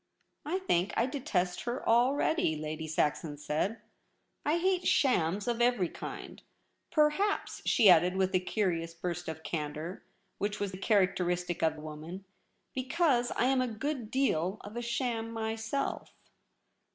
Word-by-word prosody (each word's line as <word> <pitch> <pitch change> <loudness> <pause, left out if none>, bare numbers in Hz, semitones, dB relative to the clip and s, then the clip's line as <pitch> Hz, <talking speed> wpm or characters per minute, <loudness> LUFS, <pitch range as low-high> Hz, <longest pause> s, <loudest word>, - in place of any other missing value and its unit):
' - - -48
I - - +3
think 195 - 0
I 235 - +4
detest 215 -10 -1
her 240 +2 -3
already,' 250 - +3
Lady 155 +1 -4
Saxon 150 0 0
said. 155 +9 -1 0.3
' - - -45 0.3
I 310 +3 +3
hate 365 +1 +1
shams 200 - +2
of 240 0 0
every 240 -8 +3
kind. - - -8 0.5
Perhaps,' 310 +7 +1
she 220 - +5
added 180 0 +6
with 190 0 +1
a 185 - +4
curious 175 -4 -1
burst 175 0 -4
of 160 0 -5
candour, 155 +2 -4 0.4
which 205 +1 -2
was 205 -2 -2
characteristic 180 -4 +1
of 160 -1 +2
the 155 - -10
woman, 155 +5 -8 0.2
' - - -46
be 260 - -2
cause 265 -6 +2
I'm 260 +1 +3
a 255 - +1
good 240 +1 -3
deal 200 -8 +1
of 205 +2 -10
a 240 - -2
sham 235 -1 -2
myself.' 225 +4 -3
205 Hz, 150 wpm, -31 LUFS, 170-250 Hz, 0.5 s, added